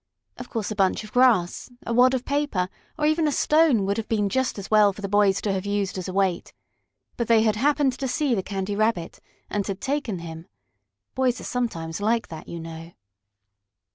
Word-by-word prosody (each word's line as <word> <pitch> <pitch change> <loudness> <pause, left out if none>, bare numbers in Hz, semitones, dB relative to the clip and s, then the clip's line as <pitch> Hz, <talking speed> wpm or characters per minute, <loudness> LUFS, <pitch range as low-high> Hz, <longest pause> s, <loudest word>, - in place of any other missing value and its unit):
Of - - -8
course 220 -4 -3
a - - -3
bunch 195 +1 +1
of 215 - -11
grass, 245 -9 +3 0.2
a 235 - -2
wad 255 +2 +5
of 255 - -3
paper, 280 -11 0 0.3
or 300 - 0
even 310 +1 +2
a - - +1
stone 300 -8 +3
would 200 +1 0
have 225 - -4
been 210 -3 +1
just 260 +1 0
as 200 +1 -7
well 210 -1 +6
for 200 - -11
the - - -1
boys 200 -1 +3
to 200 - -1
have 190 -1 -2
used 200 -1 -1
as 185 -1 -4
a - - -3
weight. 190 -2 0 0.6
But 235 - -1
they 225 -1 +5
had 215 -2 +2
happened 275 +2 +1
to 270 - -1
see 270 +1 0
the 200 - +1
Candy 195 +1 -3
Rabbit, 215 -5 -1 0.3
and 205 -1 -2
had 195 -1 -4
taken 270 -5 -2
him. 165 -1 -8 0.7
Boys 255 -2 +1
are - - -9
sometimes 185 -9 -3
like 225 +2 0
that, 160 -1 -9
you 170 - -6
know. 165 +1 -9
210 Hz, 210 wpm, -24 LUFS, 190-250 Hz, 0.7 s, well